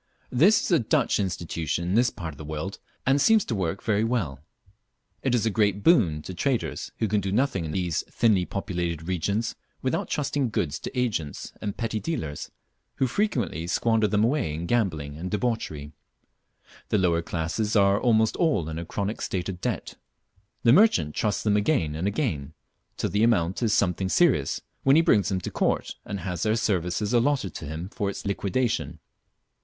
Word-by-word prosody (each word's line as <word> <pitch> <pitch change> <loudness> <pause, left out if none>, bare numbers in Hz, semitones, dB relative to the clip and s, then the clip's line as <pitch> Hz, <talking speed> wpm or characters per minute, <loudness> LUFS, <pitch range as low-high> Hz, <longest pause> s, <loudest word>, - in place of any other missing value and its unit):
This 180 - +5
is - - -2
a 170 - +5
Dutch 115 - +1
institution 85 -3 -2
in - - 0
this 120 +3 +4
part 85 -7 -7
of 70 - -16
the - - -7
world, 80 +6 -5 0.3
and 135 +2 +3
seems 220 +5 +5
to - - -3
work 95 -2 -2
well. 105 - 0 0.8
It 130 -2 +1
is 115 - +1
a 110 - +2
great 100 -1 +1
boon 85 - +4
to 95 - -6
traders, 125 +7 -2
who 110 - 0
can 105 0 +1
do 95 0 -2
nothing 105 - +1
in 75 - -4
these 90 -1 -1
thinly 105 -6 +3
populated 85 -5 -3
regions 100 +5 -1 0.3
without - - -1
trusting 140 -3 0
goods 80 -7 -1
to 130 - -4
agents 100 - -2
and 100 -1 -4
petty 115 -2 -2
dealers, 80 - -4 0.5
who 135 - +1
frequently 120 - -1
squander 110 +3 +2
them 105 0 +2
away 115 - +1
in 85 +2 -4
gambling 80 -10 -1
and 90 +3 -5
debauchery. 105 -10 -2 1.0
The - - +2
lower 85 -3 +2
classes 90 +7 -2
are 100 -1 +4
almost 110 -3 +3
all 125 - +1
in 80 +1 -4
a 85 - -5
chronic 100 +5 -3
state 90 0 -2
of 90 -2 -6
debt. - - -3 0.7
The 115 - +6
merchant 115 - +4
trusts 105 -2 -1
them 105 -1 +2
again 105 - +1
and 80 +5 -2
again, 80 - -2 0.4
till - - -1
the 105 - +1
amount 100 -5 +2
is 115 -3 +2
something 95 -1 +1
serious, 125 - +2 0.2
when 135 +1 +5
he 165 - +6
brings 105 - +3
them 95 -2 -1
to - - -5
court - - 0
and 100 -2 -5
has 90 -3 -4
their 110 +2 +2
services 100 0 0
allotted 120 - +2
to - - -7
him 80 +4 -5
for 100 -1 -2
its 100 - -6
liquidation. 100 - -1
100 Hz, 180 wpm, -26 LUFS, 85-115 Hz, 1.0 s, The